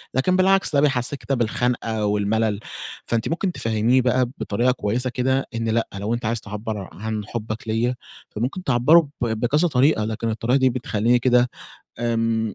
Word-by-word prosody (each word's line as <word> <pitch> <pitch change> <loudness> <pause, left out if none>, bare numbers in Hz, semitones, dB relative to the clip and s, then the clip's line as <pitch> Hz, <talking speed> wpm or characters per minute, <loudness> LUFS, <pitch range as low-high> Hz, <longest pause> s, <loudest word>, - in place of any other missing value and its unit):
لكن 160 +8 +2
بالعكس 190 -3 +3
ده 140 - +5
بيحسّسِك 140 -1 +1
كده 135 +1 -2
بالخنقة 115 -2 -1
والملل، 105 +1 +1 0.5
فأنتِ 115 -1 -1
ممكن 180 +3 -1
تفهّميه 115 -2 +1
بقى 125 0 +1
بطريقة 120 +5 +1
كويسة 125 +1 -1
كده، 130 +2 0
إن 115 0 -1
لأ 115 +1 +1
لو 100 +3 -2
أنت 120 0 -3
عايز 115 0 -1
تعبّر 105 -1 -5
عن 110 0 -4
حُبّك 110 0 -5
ليّا 115 +3 0 0.3
فممكن 125 - -3
تعبّرُه 145 +2 +5 0.2
ب - - +2
بكذا 150 +9 +2
طريقة، 135 -5 +2
لكن 110 +1 -3
الطريقة 115 +4 +1
دي 130 -1 +3
بتخلّيني 120 -1 +1
كده 125 0 +3 0.5
آمم 115 -2 0
120 Hz, 165 wpm, -22 LUFS, 110-130 Hz, 0.5 s, ده